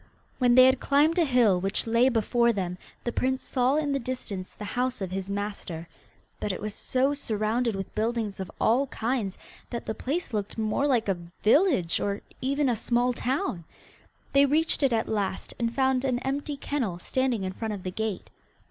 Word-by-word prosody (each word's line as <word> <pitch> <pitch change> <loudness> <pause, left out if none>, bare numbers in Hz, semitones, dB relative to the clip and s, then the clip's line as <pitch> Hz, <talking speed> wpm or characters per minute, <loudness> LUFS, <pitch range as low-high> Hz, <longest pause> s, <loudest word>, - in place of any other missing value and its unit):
When 245 -2 +4
they 255 0 +9
had 260 0 +4
climbed 300 +5 +3
a 335 - +4
hill 240 -9 +4
which 195 +2 -1
lay 235 +3 +4
before 235 0 +2
them 180 -4 -3 0.2
the 240 - -1
prince 260 +2 0
saw 255 +1 +1
in 300 -2 0
the 275 - +1
distance 230 -7 -5
the 210 - -8
house 250 +4 -1
of 190 -3 -4
his 190 0 -3
master, 200 -5 -4 0.5
but 210 - -1
it 185 - -4
was 210 0 -4
so 260 +5 +1
surrounded 225 -3 0
with 195 -1 -5
buildings 220 -2 -1
of 190 - -4
all 255 +5 +3
kinds 230 -5 -2 0.3
that 235 - -5
the - - -2
place 285 +4 -3
looked 205 0 -3
more 220 +6 +1
like 245 -6 +2
a 190 -3 0 0.2
village 225 - +4
or 200 0 -2 0.2
even 280 +2 +1
a 245 - +2
small 240 +3 +1
town. 245 - -2 0.7
They 280 0 +6
reached 315 +4 +2
it 275 -2 +3
at 225 -1 +1
last, 200 -3 -2
and 230 -1 0
found 265 0 +1
an 255 -2 +1
empty 285 +2 -2
kennel 250 -11 -2
standing 250 +3 0
in 185 0 -3
front 220 +1 -3
of 190 - -9
the 185 - -3
gate. 220 0 -4
235 Hz, 190 wpm, -27 LUFS, 205-265 Hz, 0.7 s, they